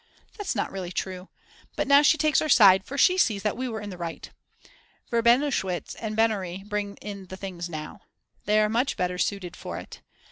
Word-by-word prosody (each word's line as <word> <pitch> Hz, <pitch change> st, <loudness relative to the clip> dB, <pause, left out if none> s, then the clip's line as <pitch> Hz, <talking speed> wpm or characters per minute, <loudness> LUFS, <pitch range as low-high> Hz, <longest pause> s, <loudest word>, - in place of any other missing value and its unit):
That's 410 Hz, -3 st, -3 dB
not -, -, -2 dB
really 185 Hz, -2 st, -5 dB
true. 185 Hz, 0 st, -5 dB, 0.5 s
But -, -, -1 dB
now 280 Hz, +1 st, +7 dB
she 300 Hz, +1 st, +4 dB
takes 305 Hz, -2 st, +2 dB
our 310 Hz, -, -2 dB
side, 195 Hz, -7 st, +7 dB
for 275 Hz, -, -6 dB
she 365 Hz, +5 st, +4 dB
sees 210 Hz, -, +2 dB
that 210 Hz, -, 0 dB
we 255 Hz, +1 st, -3 dB
were 220 Hz, -2 st, -5 dB
in 205 Hz, -1 st, -7 dB
the 180 Hz, -, -9 dB
right. 170 Hz, -1 st, -6 dB, 0.8 s
Verbenowitsch 235 Hz, -, +1 dB
and 215 Hz, -1 st, -4 dB
Bennari 195 Hz, -5 st, 0 dB
bring 205 Hz, -1 st, -3 dB
in 200 Hz, -2 st, -8 dB
the 190 Hz, -, -8 dB
things 180 Hz, -3 st, -6 dB
now. 155 Hz, -2 st, -7 dB, 0.4 s
They 210 Hz, +1 st, +3 dB
are 210 Hz, -, +3 dB
much 235 Hz, +5 st, 0 dB
better 180 Hz, 0 st, -2 dB
suited 180 Hz, -1 st, -2 dB
for -, -, -7 dB
it. -, -, -10 dB
205 Hz, 200 wpm, -26 LUFS, 185-235 Hz, 0.8 s, now